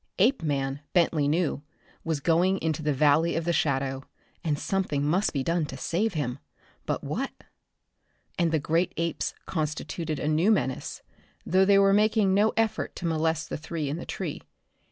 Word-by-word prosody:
Apeman, 145 - +1
Bentley 165 -4 +3
knew, 155 -1 0 0.4
was 160 -4 -2
going 175 +4 +3
into 160 -3 -2
the 150 -1 0
Valley 150 +4 +3
of 165 - -1
the 170 - +1
Shadow, 135 -3 0 0.4
and 155 -4 0
something 150 -6 -1
must 180 +7 +2
be 140 -3 -1
done 165 0 0
to 135 - -7
save 185 +9 -1
him. 140 -4 -2 0.5
But - - -1
what? - - -2 1.1
And 170 -2 +1
the 160 - +3
great 165 +4 0
apes 170 0 -2
constituted 155 0 -3
a 145 - -3
new 155 +6 +3
menace, 160 - -1 0.4
though 190 +2 +4
they 200 0 +5
were 195 0 +5
making 210 -1 +3
no 210 +3 +4
effort 225 -2 0
to 175 - -6
molest 160 0 0
the - - -2
three 155 -1 -4
in 150 - -2
the - - -6
tree. - - -4
165 Hz, 170 wpm, -27 LUFS, 150-185 Hz, 1.1 s, they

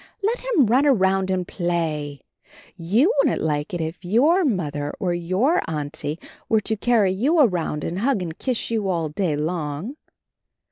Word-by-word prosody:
Let 455 +5 0
him 460 - +2
run 255 +7 +3
around 190 -6 +2
and 185 -1 -1
play. 160 -5 -2 0.5
You 220 - +2
wouldn't 275 -2 +2
like 150 -1 -1
it 175 - -3
if 160 +3 -5
your 280 - +3
Mother 150 - -1
or 180 -2 0
your 185 - +1
Auntie 150 0 -4 0.3
were 220 -1 +3
to 220 +2 -2
carry 215 -3 +2
you 270 - +1
around 175 - +1
and 175 +3 -3
hug 250 +1 +1
you 170 - -4
and 160 - -11
kiss 250 -3 -2
you 215 -4 0
all 165 -4 -1
day 155 0 -1
long. 155 - -3
185 Hz, 170 wpm, -23 LUFS, 160-240 Hz, 0.5 s, run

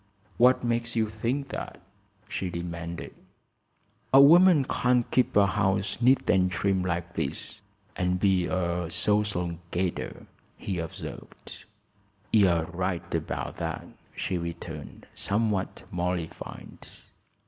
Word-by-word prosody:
"What 125 +1 +5
makes 120 0 -1
you 110 -1 +2
think 120 +6 -2
that?" - - -6 0.5
she 95 - -3
demanded. 85 -1 -6 1.0
"A 135 - +8
woman 165 +1 +7
can't 125 -1 +2
keep 125 -4 +2
a 100 - +7
house 95 +2 0
neat 130 +3 +4
and 95 -1 +4
trim 95 +1 0
like 85 -1 -2
this, - - -4 0.3
and 90 0 0
be 95 -2 +2
a 85 -2 -1
social 90 -2 0
gadder," 90 0 -3 0.3
he 95 -3 -3
observed. 80 -1 -8 0.7
"You're 90 -7 +4
right 90 +1 -3
about - - -3
that," - - -4 0.3
she 90 -2 -2
returned, 85 -3 -7
somewhat 105 -2 -1
mollified. 90 -2 -4
95 Hz, 115 wpm, -27 LUFS, 85-115 Hz, 1.0 s, A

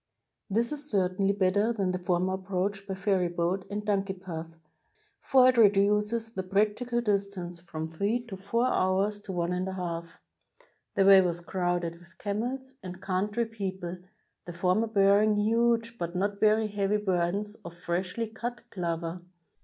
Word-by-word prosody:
This 230 +6 +1
is 295 0 -3
certainly 195 0 +1
better 200 +3 +2
than 195 -5 0
the 185 - -2
former 180 +1 0
approach 195 +1 -2
by 190 - -3
ferryboat 185 -1 0
and 205 +1 -4
donkey 195 -2 0
path, 165 -3 -7 0.6
for 255 -1 +5
it 255 -1 +4
reduces 210 +2 +3
the 195 - -3
practi 210 +5 0
cal 240 0 +1
distance 200 -5 -2
from 160 -2 -5
three 205 +9 -1
or - - -3
four 200 +6 0
hours 200 -1 +1
to 205 - -7
one 175 -1 -1
and 180 +1 -1
a 190 - -3
half. 170 -2 -4 0.9
The 195 - +4
way 195 -1 +9
was 175 -2 -1
crowded 175 -1 -2
with 170 0 -21
camels 250 +6 -3
and 180 -1 -8
coimtry 205 +5 -1
peo 195 -4 -4
ple, 175 0 -5 0.5
the 175 - -6
former 185 +6 +1
bearing 205 0 +4
huge 230 +2 +1
but 170 +1 -3
not 200 +2 -1
very 215 +1 +4
heavy 205 0 0
burdens 195 +1 -1
of 170 0 -9
freshly 180 +6 -2
cut 235 +2 -6
clover. 170 -1 -3
195 Hz, 160 wpm, -28 LUFS, 180-210 Hz, 0.9 s, way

